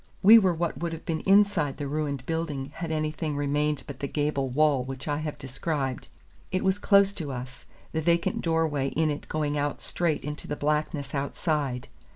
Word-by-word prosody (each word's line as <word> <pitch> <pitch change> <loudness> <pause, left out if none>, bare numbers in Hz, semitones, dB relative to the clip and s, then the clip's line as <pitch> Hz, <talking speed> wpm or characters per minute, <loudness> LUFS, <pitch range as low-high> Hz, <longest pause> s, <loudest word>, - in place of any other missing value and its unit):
We 220 +4 +10
were 185 -5 +2
what 170 0 -2
would 170 -1 -2
have 165 - -8
been 160 -1 -1
inside 195 -8 +4
the 145 - -3
ruined 140 -2 -2
building 150 -4 -3
had 165 -1 -3
anything 155 -1 -2
remained 145 +1 0
but 140 -2 -8
the 140 - -2
gable 145 -2 -1
wall 140 0 +3
which 135 +2 -7
I 145 -1 0
have 150 -1 -4
described. 135 -1 -3 0.4
It 185 - 0
was 190 +1 +2
close 200 -1 +5
to 155 -7 -5
us, 125 0 -7 0.3
the 160 - -1
vacant 170 +2 +1
door 165 -1 +2
way 140 -3 -1
in 155 +2 +1
it 145 - -6
going 150 -2 -1
out 145 0 -1
straight 170 -4 -1
into 150 0 -6
the 145 - -2
blackness 150 -1 -1
outside. 140 -2 -1
150 Hz, 195 wpm, -27 LUFS, 140-165 Hz, 0.4 s, We